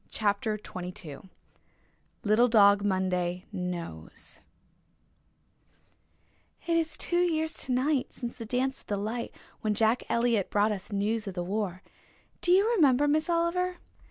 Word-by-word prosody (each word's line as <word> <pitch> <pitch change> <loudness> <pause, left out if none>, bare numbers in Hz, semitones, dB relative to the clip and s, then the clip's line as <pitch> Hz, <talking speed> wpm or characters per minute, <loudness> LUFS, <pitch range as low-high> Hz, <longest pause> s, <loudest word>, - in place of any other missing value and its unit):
CHAPTER 210 0 0
XXII 180 -5 -8 0.9
LITTLE 215 +3 +4
DOG 200 -3 +5
MONDAY 185 -2 0
KNOWS 175 - -4 2.3
"It 335 -1 +1
is 325 -1 0
two 345 - 0
years 320 -2 +1
tonight 260 +2 0
since 240 -2 -6
the 230 - -7
dance 260 +3 -1
at - - -30
the 205 - -1
light, 220 +4 -3 0.3
when 215 -1 0
Jack 225 +3 +3
Elliott 235 -4 +1
brought 210 +1 +2
us 200 0 -5
news 210 +2 -1
of 190 - -5
the 175 - -2
war. 190 -1 -3 0.6
Do 350 - +2
you 390 +4 +5
remember, 290 - +4
Miss 310 +3 +1
Oliver?" 350 +2 +1
220 Hz, 130 wpm, -29 LUFS, 195-290 Hz, 2.3 s, DOG